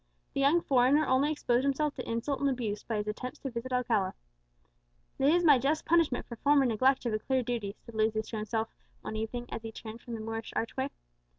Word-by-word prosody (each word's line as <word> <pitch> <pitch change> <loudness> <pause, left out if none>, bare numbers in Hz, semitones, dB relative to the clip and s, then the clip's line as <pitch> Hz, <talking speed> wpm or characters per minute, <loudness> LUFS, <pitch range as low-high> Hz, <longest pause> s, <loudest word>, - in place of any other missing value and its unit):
The - - -2
young 285 +5 +4
foreigner 270 +3 +4
only 270 +4 +3
exposed 250 -4 +1
himself 280 +2 +1
to - - -6
insult 230 +5 -1
and 280 - +2
abuse 230 -6 -2
by 225 - -3
his 210 0 -2
attempts 250 +4 -4
to 270 - -4
visit 240 +2 -5
Alcala. 230 -6 +1 1.0
"This 280 +5 +5
is 350 - +2
my 290 -6 +7
just 295 +5 0
punishment 330 -6 +2
for 235 - -8
former 285 +2 +4
neglect 260 +3 +2
of 235 - 0
a 215 - 0
clear 260 +3 0
duty," 225 -4 -3
said 235 - -11
Lucius 220 0 0
to 225 - -4
himself 220 +1 -1 0.3
one 220 - -5
evening, 225 +3 -3
as - - -4
he 225 0 -6
turned 225 +1 -9
from 235 - -6
the - - -6
Moorish 225 0 -5
archway. 260 +4 -1
245 Hz, 215 wpm, -30 LUFS, 225-275 Hz, 1.0 s, my